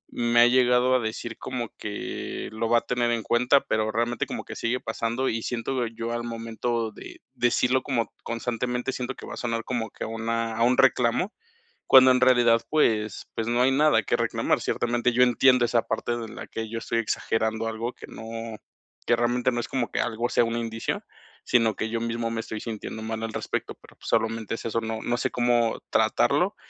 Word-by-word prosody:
me 120 0 +3
ha 120 - +8
llegado 125 0 +4
a - - +4
decir 115 +1 -5
como 120 -3 -4
que 105 -1 -5
lo 110 +1 -2
va 120 0 +5
a - - -18
tener 120 -1 0
en 115 -2 -1
cuenta, 125 +5 +3
pero 110 0 -1
realmente 115 +1 -1
como - - -5
que - - -8
sigue 120 +2 -1
pasando 115 +3 -2
y 115 - -2
siento 120 +1 -2
yo 115 +1 -5
al 120 0 -2
momento 115 0 -3
de - - -11
decirlo 125 +2 +2
como 120 -5 -1
constantemente, 125 +2 -2
siento 125 0 -4
que - - -10
va - - -7
a - - -11
sonar 115 -1 -2
como 115 -3 -3
que - - -8
a - - -3
una 115 0 -2
a 115 - -3
un 125 +1 +3
reclamo, 125 - +3 0.5
cuando 130 0 +8
en 125 0 +2
realidad 120 -2 +5
pues 110 -9 +1
pues 115 - -2
no 120 +1 +2
hay 130 - +4
nada 150 +3 +4
que - - +1
reclamar, - - 0
ciertamente 120 +1 0
yo 125 +2 +5
entiendo 125 0 +4
esa 115 -1 +2
parte 120 - -2
de 115 -1 -5
la 110 - -8
que 110 -1 -5
yo 115 - -4
estoy 115 0 -1
exagerando 110 0 -1
algo 115 +2 -3
que - - -11
no 115 0 -7 0.5
que 120 - +5
realmente 120 +1 +1
no 120 - -2
es - - -6
como 125 -4 -2
que - - -2
algo 115 +2 -2
sea 120 - +3
un 115 0 -2
indicio, 115 -1 -3 0.4
sino 115 -3 +3
que 110 - -3
yo 115 0 -1
mismo 115 0 -2
me 115 - -3
estoy 110 -1 -6
sintiendo 110 -1 -6
mal 110 0 -4
al 115 - -4
respecto, - - -3
pero - - -18
pues - - -12
solamente 115 -1 0
es - - -8
eso, 115 0 0
no 110 0 -4
no 120 0 0
sé - - 0
cómo 120 -2 +1
tratarlo - - +2
115 Hz, 210 wpm, -26 LUFS, 115-125 Hz, 0.5 s, ha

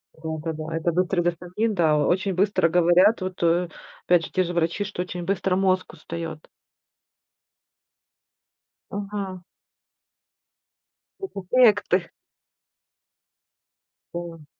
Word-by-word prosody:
Да-да-да. 160 0 -5
Это 165 +1 0
быстрый 180 +1 +1
дофамин, 180 +6 -1
да, 160 -4 +3
очень 185 +6 +1
быстро, 195 -2 +2
говорят, 180 +5 +4
вот, 185 0 -5
э, 170 +1 +2 0.4
опять 175 -2 +3
же - - -11
те 185 - +2
же 175 0 -4
врачи, 170 +4 0
что 200 -3 -4
очень 180 -1 -6
быстро 190 0 0
мозг 185 -1 +1
устает. 165 -2 -7 2.4
Мгм. 200 -2 -5 1.8
Э, 385 - -4 0.3
э, 250 - +9
э, - - +4
к 205 - -5
ты 180 -1 0 2.0
О. 170 -3 -7
175 Hz, 110 wpm, -24 LUFS, 165-190 Hz, 2.4 s, э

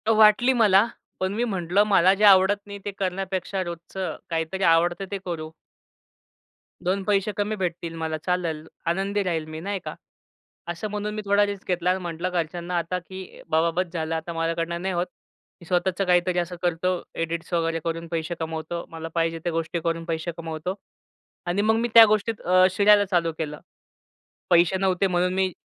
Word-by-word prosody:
वाटली 215 +4 +6
मला, 210 -4 +5 0.3
पण 185 +1 -1
मी 230 +3 0
म्हंटलं 195 -3 +1
मला 190 -2 +5
जे 200 +2 -2
आवडत 195 0 +6
नाही 200 0 -8
ते 205 - -2
करण्यापेक्षा 190 0 -2
रोजचं 175 +2 -5
काहीतरी 165 +3 -2
आवडतं 175 +3 +3
ते 200 - -1
करू. 160 -3 -4 1.3
2 190 +2 0
पैसे 200 0 +1
कमी 210 +1 0
भेटतील 175 -3 -3
मला, 160 -1 -3
चालेल. 165 -2 -2 0.2
आनंदी 195 +4 0
राहील 165 -4 -1
मी 155 0 -7
नाही 200 +3 -3
का. - - -5 0.7
असं 175 +5 -4
म्हणून 210 0 -3
मी 215 - -3
थोडा 200 +1 +4
रिस्क 200 -1 -6
घेतला 180 -1 0
आणि 185 +1 +1
म्हटलं 170 +1 -3
घरच्यांना 175 0 -2
आता, 170 +2 -1
की 185 +1 -10
बाबा 160 +1 +3
बस 185 -2 -6
झालं. 165 -1 -2
आता 160 +1 -4
माझ्याकडनं 165 +1 -2
नाही 190 0 -1
होत. 175 +1 -1 0.5
मी - - -12
स्वतःचं 185 +2 +1
काहीतरी 180 0 +2
असं 175 +1 -3
करतो. 175 +1 0
एडिट्स 165 +1 -3
वगैरे 165 -1 +1
करून 165 0 -3
पैसे 165 +1 -2
कमवतो. 160 +1 -4
मला 165 0 -7
पाहिजे 165 0 0
त्या 175 - -1
गोष्टी 165 +1 -2
करून 165 0 -1
पैसे 165 +1 -2
कमवतो 165 +2 -4 0.7
आणि 180 +3 +1
मग 220 +1 +3
मी 235 - +1
त्या 230 -1 +11
गोष्टीत 215 +1 0 0.3
शिरायला 205 +2 +5
चालू 175 -4 +1
केलं. 150 -2 -4 0.9
पैसे 175 +2 +5
नव्हते 190 0 +1
म्हणून 180 0 +1
मी 190 0 +1
180 Hz, 175 wpm, -25 LUFS, 165-195 Hz, 1.3 s, त्या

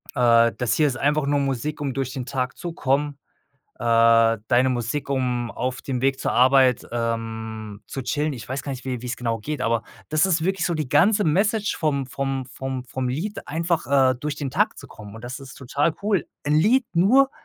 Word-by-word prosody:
äh: 115 -2 +5
„Das 120 -2 0
hier 155 -2 +3
ist 130 -2 -2
einfach 145 +1 +1
nur 145 0 +1
Musik, 140 +2 -2
um 140 -2 -2
durch 135 -1 -3
den 130 -3 -4
Tag 130 -1 -3
zu 175 - -5
kommen. 145 -1 0 0.6
Äh, 115 -1 +4
deine 125 +2 +4
Musik 125 +3 -2
um, 125 -3 -1
auf 130 +1 -3
dem 130 -3 -3
Weg 135 0 +1
zur - - -1
Arbeit, 130 0 +4
ähm, 110 -2 -4
zu 135 - -5
chillen“, 150 +3 -1
ich 120 - -9
weiß 130 +1 -3
gar 140 - -5
nicht, 125 - -9
wie 125 -3 -3
wie's 125 0 -4
genau 115 -2 -2
geht, 150 +7 -4
aber 115 -1 +1 0.3
das 155 +3 +3
ist 170 -4 +1
wirklich 190 0 0
so 175 - 0
die 155 -5 -3
ganze 200 - +4
Message 205 +6 +1
vom 140 -4 0
vom 135 0 -3
vom 130 0 -5
vom 130 0 -4
Lied, 160 +12 -4
einfach, 165 -2 -1 0.2
äh, - - -3
durch 150 +1 -3
den 140 -3 -4
Tag - - +1
zu - - -10
kommen 105 0 -11
und 115 - -11
das 125 +2 -6
ist 135 -1 -11
total 145 +4 -1
cool, 200 -7 +1 0.2
‘n 145 +1 +1
Lied 225 - +4
nur 250 +11 +4
135 Hz, 210 wpm, -23 LUFS, 120-150 Hz, 0.6 s, äh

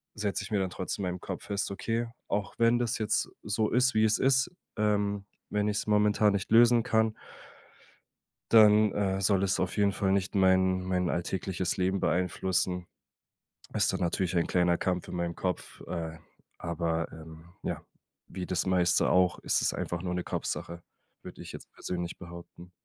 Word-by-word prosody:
setze 100 -1 -2
ich - - -8
mir 105 - +2
dann 95 -1 -1
trotzdem 95 +1 -4
in 90 - -1
meinem 90 - -6
Kopf - - -6
fest, 100 0 -2
okay, 115 +4 -2 0.2
auch 100 0 -2
wenn 115 +1 +4
das 120 -2 0
jetzt 110 -1 0
so 105 +1 0
ist, 125 +2 +3
wie 110 - +4
es 110 - +3
ist, 130 -1 +3 0.3
ähm, 105 -1 0 0.2
wenn 105 0 0
ich's 105 0 -1
momentan 105 0 +3
nicht 100 - -2
lösen 120 +1 +6
kann 110 0 +2 1.4
dann, 105 -1 +7
äh, 95 -1 -1
soll 95 0 +2
es 95 - +1
auf 95 +3 -2
jeden 100 -1 +3
Fall 95 -2 0
nicht 100 +1 0
mein 95 -1 +3
mein 90 -1 -1
alltägliches 90 +1 -2
Leben 95 +1 0
beeinflussen. 90 +1 0 0.9
Ist - - +2
dann - - -3
natürlich 90 +1 0
ein 85 - +1
kleiner 90 -1 +2
Kampf 90 -1 -2
in - - -5
meinem 85 -1 -2
Kopf, 90 -1 -4
äh, 80 -1 -4 0.4
aber, 85 -1 -2
ähm, 80 0 -11 0.2
ja, - - -3 0.5
wie 90 -1 -6
das 90 -2 -1
meiste 90 -2 +3
auch, 90 -2 +3
ist - - +1
es - - +1
einfach 85 -1 -3
nur 90 -1 -3
'ne 90 -1 -2
Kopfsache, 85 0 -4 0.4
würde - - -10
ich - - -9
jetzt - - -10
persönlich 85 -1 -4
behaupten. 85 0 -11
95 Hz, 175 wpm, -29 LUFS, 90-105 Hz, 1.4 s, dann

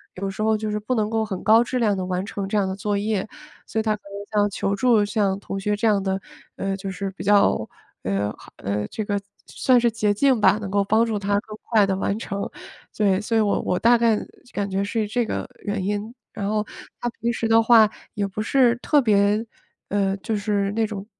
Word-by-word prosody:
有 195 +1 -3
时 195 +2 -6
候 220 0 +2
就 215 0 -3
是 210 - -1
不 250 +5 -1
能 215 -2 0
够 225 0 0
很 200 -4 -4
高 225 +2 +6
质 250 +1 -2
量 215 -4 +2
地 185 -1 -3
完 185 +1 -2
成 200 -1 -4
这 210 - 0
样 200 -2 +2
的 190 - -3
作 205 +1 -1
业。 205 -1 -1 0.4
所 220 - -2
以 - - 0
他 215 -1 +1
可 210 - -17
能 205 +1 -2
像 205 - +2
求 200 0 -1
助 225 -1 +3
像 205 -2 0
同 195 - -5
学 205 +1 -1
这 225 +2 +1
样 205 -2 +2
的， 190 0 -1 0.4
呃， 195 0 -2
就 195 0 -5
是 195 +1 -4
比 190 - -9
较， 200 - +3 0.4
呃 100 +2 0
好， - - -15
呃， 105 +2 -2
这 215 - -5
个， 205 0 0
算 200 - -25 0.2
算 255 -2 +3
是 240 - +4
捷 215 -2 +1
径 260 +3 +3
吧， 195 +1 +5
能 205 -2 -5
够 200 +1 +2
帮 220 +3 +3
助 225 -2 -1
他 200 0 +1
更 215 -1 -10
快 215 -3 +5
地 190 - 0
完 195 +2 -1
成， 200 -3 -4 0.5
对， 200 -2 +2
所 225 +1 0
以 - - +4
我 205 -1 +1
我 180 - -1
大 240 +1 +5
概 230 -2 +3 0.4
感 200 0 -2
觉 195 +1 0
是 215 +1 -1
这 240 +3 0
个 - - -3 0.2
原 205 -2 -2
因。 205 +3 -3 0.2
然 200 0 -3
后 210 0 0 0.3
他 240 - -1
平 235 - +1
时 230 -1 -2
的 225 0 +5
话 225 -2 +6 0.2
也 205 -2 -1
不 195 +2 -5
是 245 +1 +3
特 290 +4 +3
别 210 -1 +3 0.4
呃， 195 -1 +1
就 220 +3 -3
是 200 -1 0
那 220 +2 +1
种 200 -2 -6
205 Hz, 260 characters per minute, -23 LUFS, 195-220 Hz, 0.5 s, 高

